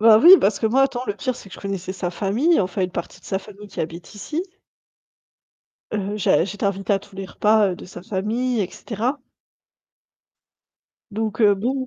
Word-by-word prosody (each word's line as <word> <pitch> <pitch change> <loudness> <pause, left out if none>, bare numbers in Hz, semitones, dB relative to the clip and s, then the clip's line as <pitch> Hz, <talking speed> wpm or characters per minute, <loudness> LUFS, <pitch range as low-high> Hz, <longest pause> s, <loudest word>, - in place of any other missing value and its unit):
Bah 220 0 +8
oui, 335 +10 +8
parce 200 0 +2
que 220 - +1
moi, 255 +5 +3
attends, 255 -2 0
le - - 0
pire, 255 +1 -2
c'est 200 - -12
que - - -9
je - - -11
connaissais 195 -2 -4
sa 185 -2 -3
famille, 220 - +2
enfin 190 +1 -2
une 185 - -1
partie 170 - -6
de - - -25
sa 190 - -1
famille 205 +1 -12
qui - - -6
habite 165 +5 -6
ici 300 - -3 1.5
heu, 205 0 -2
j'ai 170 - +3
j'étais 200 +2 -7
t'invitée 195 +1 0
à - - +1
tous 200 0 -17
les 195 - -4
repas, 210 +1 +3
heu, - - -3
de - - -11
sa 175 -1 -10
famille 225 +6 -1
et 185 -2 -2
cetera 240 +9 -3 1.9
donc 220 +1 -3
heu, 205 -2 +6
bon, 255 +6 -2
205 Hz, 200 wpm, -22 LUFS, 195-230 Hz, 1.9 s, Bah